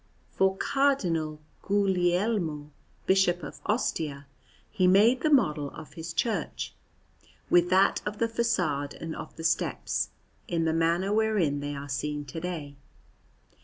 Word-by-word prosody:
For 190 0 +2
Cardinal 175 - +1 0.2
Guglielmo, 180 -5 +1 0.3
Bishop 185 -3 +3
of 145 - -8
Ostia, 155 - -1 0.5
he 185 -4 +2
made 220 +7 +5
the 310 - +2
model 155 - +3
of 160 - -10
his 165 0 -6
church, 225 +6 -2 0.8
with 175 0 +5
that 190 +1 +4
of 210 0 -4
the 230 - +1
façade 175 -12 -1
and 165 -1 -5
of - - -8
the 165 - -8
steps, 165 +1 0 0.4
in 165 -2 0
the 160 - +1
manner 170 +4 +1
wherein 210 -10 +2
they 145 0 -4
are 140 0 -6
seen 145 +2 -3
to 145 +4 -6
day. 160 -5 -5
175 Hz, 135 wpm, -28 LUFS, 150-205 Hz, 0.8 s, made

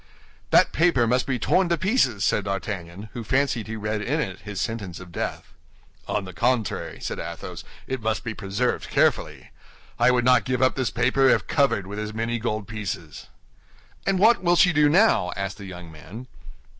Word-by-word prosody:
"That - - +5
paper 160 -7 +3
must 125 +2 +1
be 130 -2 0
torn 180 +9 +2
to 170 - +2
pieces," 185 - +1
said 105 - +1
D'Artagnan, 100 0 -5
who 120 - -5
fancied 130 -2 0
he 110 - -5
read 105 0 -3
in 145 +9 -1
it 95 - -3
his 105 -2 -7
sentence 100 -6 -4
of 90 -1 -11
death. - - -5 0.5
"On 105 -2 -1
the 95 - -9
contrary," 115 +5 -1
said - - -4
Athos, 85 +1 -7 0.2
"it 130 -2 -4
must 110 0 -1
be 115 - -4
preserved 100 +5 -2
carefully. - - 0 0.5
I 120 +1 +5
would 125 -1 +2
not 125 0 +5
give 130 -1 -1
up 130 - +4
this 130 -3 -1
paper 130 +3 +2
if - - +3
covered 140 -10 +1
with 100 +2 -6
as 105 0 -5
many 115 +1 -1
gold 110 -3 -3
pieces." 100 -7 -6 0.8
"And 195 -1 +2
what 225 +5 +5
will 175 -1 +3
she 180 0 +5
do 150 0 +4
now?" 170 - +3
asked 100 0 -4
the 100 - -8
young 90 -3 -9
man. 90 +10 -10
115 Hz, 190 wpm, -24 LUFS, 100-130 Hz, 0.8 s, That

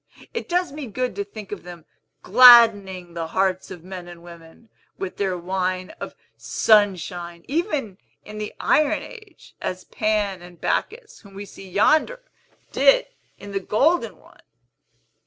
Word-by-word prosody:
It 465 - -5
does 355 -3 0
me 290 -2 -7
good 250 +4 -3
to 200 - -1
think 200 0 -11
of 205 - -6
them 175 -2 -12 0.4
gladdening 205 -6 +6
the 165 -1 -4
hearts 185 +1 -1
of 175 -3 -10
men 185 -1 -9
and 170 -1 -12
women, 170 +5 -15 0.3
with 190 -1 -6
their 190 -2 -1
wine 185 +1 -3
of - - -7 0.2
Sunshine, 180 -5 +1
even 280 - -2 0.3
in 215 0 -9
the 210 - -6
Iron 300 -1 +2
Age, 430 -7 -14
as 185 0 -4
Pan 210 -4 -1
and 175 -1 -14
Bacchus, 450 0 -3
whom 200 -3 -17
we 200 +1 -7
see 195 -1 -13
yonder, 310 - +2 0.5
did - - +4 0.3
in 205 - -10
the 195 - -1
Golden 285 - +1
one!" - - -22
200 Hz, 150 wpm, -22 LUFS, 180-250 Hz, 0.5 s, gladdening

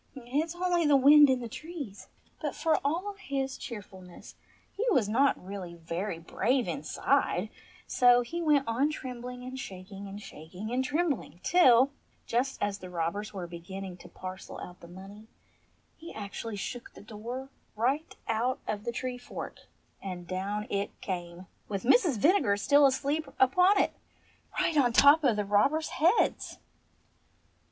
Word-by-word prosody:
"It 265 +4 -1
is 335 +1 -8
only 350 -1 +1
the 290 - +5
wind 290 +2 +8
in 260 -1 +2
the 235 - -4
trees." 285 - -8 0.3
But - - -3
for 320 -2 +2
all 350 +8 -1
his 270 -4 -3
cheerfulness 190 -7 -10 0.4
he 410 - -2
was 255 - +3
not 265 +6 +3
really 185 -2 -7
very 170 +3 -4
brave 235 +9 0
inside, 275 - 0 0.4
so 245 -1 +5
he 335 +8 -4
went 295 -5 +3
on 255 +6 +2
trembling 250 -3 -6
and 255 +1 -6
shaking 195 -3 -8
and 195 +1 -8
shaking 185 +4 -9
and 255 +1 +1
trembling, 290 - -1
till, 270 -7 +5 0.3
just 255 +3 -1
as 205 -1 -1
the 185 - -9
robbers 180 +5 -3
were 190 -3 -5
beginning 180 +2 -7
to - - -13
parcel 185 0 -8
out 180 0 -9
the 170 - -13
money, 195 +5 -12 0.7
he 330 +1 -10
actually 210 +1 -5
shook 235 +4 -6
the - - -11
door 235 +5 -7 0.3
right 265 +8 0
out 235 +3 0
of 210 -1 -3
the 235 - -1
tree 250 +1 -4
fork, 245 - -8 0.3
and 180 -3 -6
down 200 +3 -3
it 200 0 -2
came 175 -1 -5
— - - -40
with 200 -2 -3
Mrs. 310 - +4
Vinegar 290 - +3
still 285 +6 +5
asleep 280 +3 -1
upon 360 +10 +5
it - - +2 0.3
— - - -11
right 320 - +1
on 245 -4 +4
top 285 +5 +7
of 250 -6 +4
the 210 -1 -1
robbers' 245 +11 +2
heads 345 +8 +1
240 Hz, 160 wpm, -29 LUFS, 200-280 Hz, 0.7 s, wind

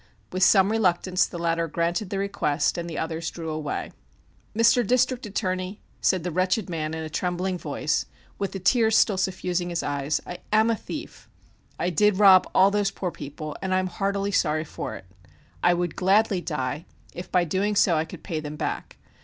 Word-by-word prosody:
With 185 - -3
some 195 +1 +5
reluctance 185 -3 +2
the 175 - -8
latter 170 0 0
granted 170 +4 -1
the 195 - -3
request 195 -7 0
and 170 0 -4
the 160 - -5
others 165 0 -3
drew 165 -2 -6
away. 155 -2 -4 0.7
"Mr. 230 +2 +5
District 255 +1 +2
Attorney," 185 -1 -3 0.2
said 185 -3 +2
the 180 - -2
wretched 185 +3 0
man 155 -1 -3
in 160 - -4
a - - -4
trembling 180 +3 -2
voice, 150 0 -1 0.3
with 195 -2 -2
the 195 - -5
tears 220 +3 +3
still 200 -3 +3
suffusing 180 -1 -1
his 170 -1 -2
eyes, 145 +1 -1
"I 180 - -7
am 220 +2 +4
a - - +1
thief; 300 +8 -8 0.5
I 175 - -1
did 210 +4 +3
rob 190 -2 +7
all 195 +1 +6
those 205 -1 +1
poor 185 -2 -4
people, 150 +1 -7
and 190 -1 0
I - - +3
am 185 - +1
heartily 200 +2 -1
sorry 155 -5 +1
for 160 - -6
it. - - -11 0.6
I 175 0 +4
would 175 -1 -2
gladly 195 0 +3
die, 150 -1 -3 0.3
if 175 - -8
by 180 - +3
doing 195 +5 0
so 190 -4 +4
I 155 - +1
could 165 -1 -11
pay 165 -5 -3
them 150 0 -6
back. - - -4
180 Hz, 195 wpm, -25 LUFS, 165-195 Hz, 0.7 s, rob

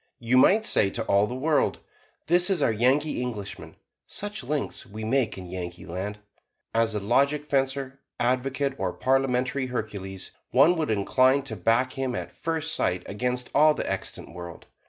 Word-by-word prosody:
You 120 +2 0
might 205 +12 +5
say 100 - +4
to - - -3
all 100 +1 +3
the 125 - -5
world, 150 +3 +1 0.5
"This 175 +3 +3
is 190 - +1
our - - +3
Yankee 130 +7 +1
Englishman; 110 -6 -6 0.3
such 205 +1 -5
links 150 -2 -3
we 110 +2 -8
make 120 0 0
in 95 - -7
Yankeeland!" 90 +2 -5 0.6
As 115 -1 +2
a - - 0
logic 140 +8 +2
fencer, 135 -1 -1 0.2
advocate 130 +3 0
or 90 -2 -1
Parliamentary 130 0 +1
Hercules, 100 -6 -5 0.2
one 140 +8 +5
would 160 -3 -1
incline 130 +6 +3
to 120 -5 -5
back 115 +7 +1
him 130 -2 -2
at - - -5
first 160 0 -2
sight 90 0 0
against 125 +4 -2
all 155 +1 +5
the - - -3
extant - - -5
world. 85 -1 -9
125 Hz, 160 wpm, -26 LUFS, 105-140 Hz, 0.6 s, might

